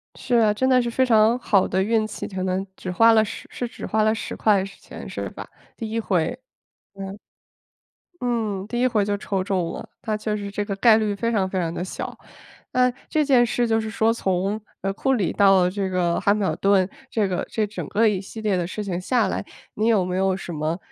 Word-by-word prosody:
是 250 - -1
啊， 220 -3 +4
真 260 +5 +1
的 255 -1 +5
是 240 -1 -1
非 260 - +2
常 225 -1 +4
好 200 -5 +2
的 190 - 0
运 220 +2 +2
气， 215 - -6
可 185 -1 -4
能 190 +1 -1
只 185 - -5
花 230 +5 +6
了 220 -1 +5
10 - - -8
是 245 - -4
只 235 - -12
花 215 0 +1
了 215 0 +3
10 225 - -5
块 205 -3 +3
钱 195 0 -10
是 - - -4
吧？ - - -9 0.3
第 225 -3 -5
一 225 +1 -1
回。 195 +2 0 0.6
嗯。 195 0 -7 1.0
嗯， 220 -6 -1
第 240 +2 -3
一 255 - +4
回 220 -4 +2
就 205 0 -1
抽 195 -1 -2
中 185 -3 -1
了， - - -7 0.2
那 215 -2 -1
确 215 0 -2
实 200 -1 -5
这 205 +1 -2
个 200 -1 -3
概 220 +2 +6
率 215 -2 0
非 230 +3 -1
常 195 -4 +1
非 185 - -1
常 165 -2 -2
地 175 - -3
小。 185 - -6 0.6
那 250 0 +4 0.2
这 310 -1 +2
件 260 -4 +5
事 240 +1 0
就 225 0 +2
是 220 - -4
说 220 +1 +2
从， 195 -1 -1 0.2
呃， 195 - -1
库 265 +7 0
里 210 -9 +1
到 195 -3 +5
这 195 0 -2
个 180 -2 0
汉 200 +1 +3
密 210 - -1
尔 - - 0
顿， 195 -2 +3 0.2
这 210 -3 +1
个 180 -2 -2
这 215 -1 0
整 205 - -6
个 225 +2 +3
一 200 -3 0
系 205 +3 -9
列 210 -3 +1
的 175 -1 -1
事 210 +4 -5
情 185 -3 -3
下 225 +2 +1
来， - - -3 0.3
你 215 - 0
有 215 -5 +3
没 180 0 -2
有 190 0 +1
什 185 -2 -7
么， 155 +2 -2
205 Hz, 245 characters per minute, -23 LUFS, 190-225 Hz, 1.0 s, 花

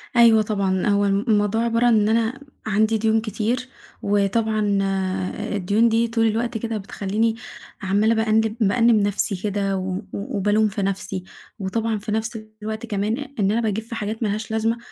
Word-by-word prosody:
أيوه 230 -2 +7
طبعًا، 195 -3 0
هو 205 0 +3
الموضوع 205 +2 +1
عبارة 235 +1 +1
عن 240 - +5
إن 210 - +2
أنا 230 +4 -1 0.3
عندي 220 +2 +2
ديون 220 +1 +2
كتير، 230 +4 -2 0.3
وطبعًا 205 0 +1
آآ، 190 +2 -2
الديون 205 +4 +2
دي 230 +1 +2
طول 225 -1 +1
الوقت 230 +2 -1
كده 225 0 -3
بتخليني 210 +3 -1 0.5
عمّالة 205 +4 +2
بأنِّب 220 0 +2
بأنِّب 230 +2 +4
نفسي 205 0 +1
كده 195 0 -1
و 185 0 -3
و - - -5
وبالوم 205 +2 +1
في 205 0 -3
نفسي، 195 -1 -3 0.4
وطبعًا 220 +3 -1
في 210 +1 -6
نفس 220 +1 -2 0.2
الوقت 220 +2 -4
كمان، 210 +1 -1 0.2
إن 200 -1 +2
أنا 230 +2 +1
باجيب 220 0 -1
في 230 +1 -8
حاجات 220 +1 -3
ما - - +1
لهاش 215 +2 -3
لازمة، 225 +1 0
215 Hz, 170 wpm, -22 LUFS, 200-225 Hz, 0.5 s, أيوه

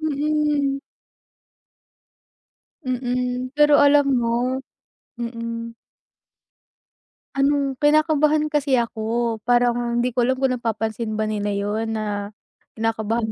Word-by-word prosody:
mm. 295 -2 0 2.1
Mm, 250 0 -2
pero 295 0 +5
alam 285 0 +5
mo, 245 0 +1 0.6
mm. 230 -1 -5 1.6
Anong 275 -1 +1
kinakabahan 305 0 +3
kasi 290 -3 +2
ako 230 -1 -1
parang 240 -1 +2
hindi 250 - 0
ko 240 0 +1
alam 260 - +2
kung 265 0 0
napapansin 225 -2 -2
ba 215 - 0
nila 210 -1 -2
'yon 215 +3 -2
na 205 -2 -3 0.5
kinakabahan 225 0 -1
245 Hz, 95 wpm, -22 LUFS, 225-280 Hz, 2.1 s, pero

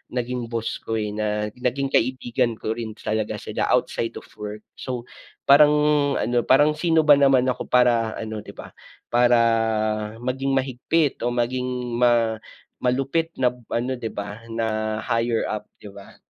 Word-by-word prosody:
naging 125 -1 -2
boss 115 -1 -3
ko, 115 - -4
eh, 105 -1 -2
na 105 0 -2
naging 135 +2 -1
kaibigan 120 -2 0
ko 110 - -4
rin 110 -1 -4
talaga 110 0 -2
sila - - -2
outside 115 - 0
of - - -9
work. 105 0 -6 0.2
So 125 -2 -4 0.5
parang 150 +1 +8 0.4
ano 120 0 0
parang 145 +3 +5
sino 165 0 +3
ba 145 -2 +7
naman 135 -2 +5
ako 125 - -3
para 120 -3 +3
ano 110 -1 -5
di - - -10
ba, - - -10 0.4
para 120 0 +4 0.9
maging 135 +2 -1
mahigpit 135 +4 0
o 120 - 0
maging 125 0 -2
ma 115 -2 +3 0.5
malupit 135 +6 0
na 125 - +5 0.2
ano 125 +2 -1
di 115 -2 -4
ba 105 +2 -7
na 110 -1 -1
higher 115 0 0
up 105 -1 -4 0.2
di - - -14
ba 100 0 -13
120 Hz, 155 wpm, -23 LUFS, 110-130 Hz, 0.9 s, parang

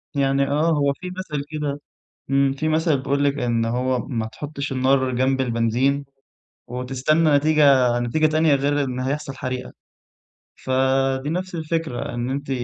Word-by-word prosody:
يعني 135 0 +2
آه 150 +3 +1
هو 140 -3 +2
في 180 +5 -8
مثل 150 -6 -4
كده 145 -2 -3 0.5
إمم 135 0 +3
في 145 +3 -3
مثل 155 -1 +2
بيقول 140 +1 -1
لِك 140 +1 +1
إن 115 -1 0
هو 125 +2 0
ما 115 -4 -2
تحطش 145 +3 -6
النار 130 0 +2
جنب 130 +1 +1
البنزين 125 +4 0 0.6
وتستنى 135 +6 +1
نتيجة 140 -5 +4
نتيجة 120 +7 +1
تانية 155 -1 +3
غير 145 +1 +1
إن 130 -1 -4
هيحصل 140 +2 -3
حريقة. 130 -1 -5 0.8
ف - - -10 0.5
دي 145 - -3
نفس 185 +2 -3
الفكرة 160 -6 -3
إن 120 +1 -2
أنتِ 140 +1 -4
140 Hz, 150 wpm, -22 LUFS, 130-150 Hz, 0.8 s, نتيجة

